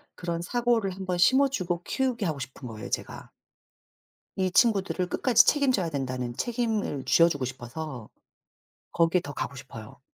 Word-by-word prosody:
그런 170 -1 -3
사고를 235 -1 +1
한번 185 -2 -3
심어주고 190 -6 +2
키우게 250 -3 -1
하고 155 -5 -2
싶은 130 0 -8
거예요 110 -2 -8
제가. - - -5 1.1
이 185 -1 0
친구들을 195 -4 +2
끝까지 235 +5 +4
책임져야 255 - +2
된다는 130 -4 -3
책임을 225 - -2
쥐어 170 0 +5
주고 145 -5 -2
싶어서 130 0 -7 0.8
거기에 170 +1 +2
더 145 - -7
가고 140 - -4
싶어요. 130 -2 -11
175 Hz, 335 characters per minute, -27 LUFS, 135-225 Hz, 1.1 s, 쥐어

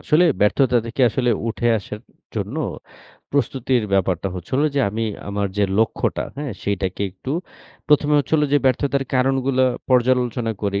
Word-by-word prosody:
আসলে 165 +3 +3 0.2
ব্যর্থতা 125 +5 +3
থেকে 115 +3 -5
আসলে 125 +1 +1 0.2
উঠে 120 +1 0
আসার 105 +1 -8 0.3
জন্য - - -3 0.7
প্রস্তুতির 130 -3 0
ব্যাপারটা 95 -1 +1
হচ্ছে 90 -2 -8
হলো, 150 +2 +3
যে 140 - +2
আমি 110 +3 -3 0.3
আমার 100 0 -1
যে 100 - +4
লক্ষ্যটা 110 - 0
হ্যাঁ? 145 -4 -4
সেটাকে 95 -1 -2
একটু 100 +8 -8 0.6
১ম 150 0 +3
এ - - +5
হচ্ছে 145 - -3
হল 150 - +3
যে 145 - +6
ব্যর্থতার 135 +2 +1
কারণগুলা 130 0 +2 0.2
পর্যালোচনা 125 -2 +2
করি। 100 -1 0
125 Hz, 155 wpm, -21 LUFS, 105-135 Hz, 0.7 s, যে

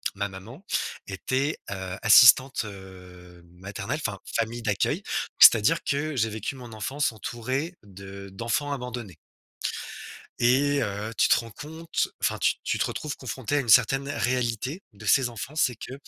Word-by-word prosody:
ma 100 0 -2
maman 115 - -11 0.4
était, 130 +9 -1
heu, 95 -1 -5
assistante, 125 +4 +7
heu, 90 -3 -12
maternelle, 95 - -5
enfin, 100 -3 -3 0.2
famille 115 +1 -2
d'accueil, 105 -3 0 0.4
c'est-à-dire 115 +10 +7
que 145 +2 -1
j'ai 110 -3 +1
vécu 110 +4 -4
mon 125 -3 -10
enfance 130 +6 -1
entouré 130 - -4
de 100 0 -10
d'enfants 115 +8 -2
abandonnés 120 - -6 1.2
et 140 +4 +3
heu, 105 +2 -4
tu - - +4
te - - +6
rends 115 -1 -8
compte, 160 +7 -3
enfin, - - +1
tu - - +2
tu - - -1
te - - +1
retrouves 150 -2 -4
confronté 130 +1 -4
à 145 - +3
une 125 - -3
certaine 135 +5 +4
réalité 125 - -1
de 105 +2 -12
ces 130 +3 +4
enfants. 120 +5 -7
C'est 125 -6 +2
que, 130 - -8
115 Hz, 155 wpm, -26 LUFS, 100-135 Hz, 1.2 s, assistante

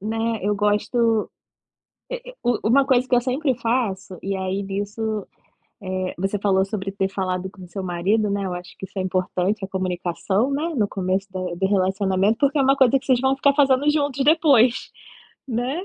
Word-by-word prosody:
né, 225 +2 -1
eu 205 +2 +1
gosto, 210 +2 +1 0.8
e - - -5
e - - -16
u 240 -2 +1
uma 270 +4 +5
coisa 255 -1 +3
que 250 - +3
eu 245 - +4
sempre 260 +3 0
faço. 210 -7 -2
E, 195 0 -2
aí, 190 +1 -2
nisso, 205 +2 -3 0.6
eh, 185 -1 -3
você 195 +3 -1
falou 190 -1 +2
sobre 195 -1 -4
ter 195 -1 -1
falado 190 -1 -3
com 185 -2 -13
seu 190 +3 -6
marido, 190 +5 0
né, 200 -1 -1
eu 180 - -3
acho 180 0 -8
que - - -6
isso 190 - -14
é - - +1
importante, 185 +2 -1
a - - -10
comunicação, 185 +5 -1
né, 315 +4 -1
no 215 -5 +1
começo 190 0 -2
da 190 - -5 0.2
do 190 +2 0
relacionamento, 195 +1 +1
porque 285 +1 +2
é - - +5
uma 270 +1 +4
coisa 270 -1 +4
que - - -19
vocês 255 -3 +3
vão 265 0 +2
ficar 280 +1 +3
fazendo 275 0 +3
juntos 285 -3 0
depois, 280 -6 +4 0.6
né. 255 +9 -2
205 Hz, 195 wpm, -22 LUFS, 190-255 Hz, 0.8 s, uma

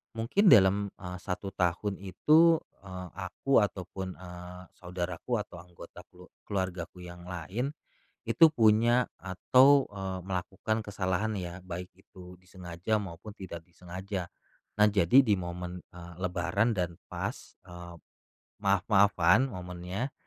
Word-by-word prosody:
mungkin 115 - +2
dalam, 100 - +6
eee, 90 -1 -7
1 95 +1 -5
tahun 95 +2 -1
itu, 155 - +4 0.3
eee, 90 -1 -7
aku 100 +9 +1
ataupun, 95 -1 -5
eee, 90 0 -9 0.2
saudaraku 90 +5 -3
atau 90 - -12
anggota 85 0 -13
kelu 90 0 -17 0.2
keluargaku 90 -2 -4
yang 90 0 -10
lain 95 - -4 0.5
itu 165 -2 +6
punya 120 0 +4
atau, 130 +9 +4
eee, 95 -2 -4
melakukan 95 +4 -2
kesalahan 100 +1 -1
ya, 90 0 -7
baik 90 0 -6
itu 90 -1 -14
disengaja 90 +2 -3
maupun 95 +1 -8
tidak 85 -3 -8
disengaja. 90 +2 -6 0.5
Nah, 105 - +7
jadi 100 +6 +5
di 105 - +3
momen, 90 0 -6
eee, 90 0 -11
lebaran 90 +5 0
dan 85 -2 -1
pas, - - -6
eee, 85 -1 -10 0.7
maaf-maafan 100 +2 +4
momennya 90 +7 -5
95 Hz, 120 wpm, -29 LUFS, 90-105 Hz, 0.7 s, Nah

